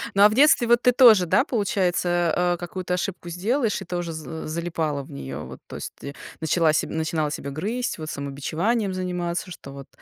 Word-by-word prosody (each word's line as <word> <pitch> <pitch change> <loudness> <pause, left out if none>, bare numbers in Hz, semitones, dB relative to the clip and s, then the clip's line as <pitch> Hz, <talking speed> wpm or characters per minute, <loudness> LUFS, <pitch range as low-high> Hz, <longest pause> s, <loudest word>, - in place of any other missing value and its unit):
Ну, 200 - +4
а 210 - +9
в - - -2
детстве, 275 -1 +5
вот, 240 0 +4
ты 250 - +5
тоже, 230 -7 +7
да, 190 +9 +3
получается, 180 - +1
а, 175 0 +1
какую-то 180 +1 -4
ошибку 175 -1 -4
сделаешь 215 +7 0
и - - -7
тоже 175 -1 -4
з 160 0 -7
залипала 160 -3 -2
в - - -14
нее? 70 0 -6
Вот, 75 - -9
то - - -9
есть - - -7
ты 140 0 -8 0.3
начала 160 0 +2
себя - - -1
начинала 160 -2 -1
себя 140 - -5
грызть, 215 - -3
вот, 155 -1 -6
самобичеванием 165 - -2
заниматься, 180 -1 -3
что 140 -5 -10
вот 135 -1 -10
175 Hz, 200 wpm, -24 LUFS, 155-200 Hz, 0.3 s, а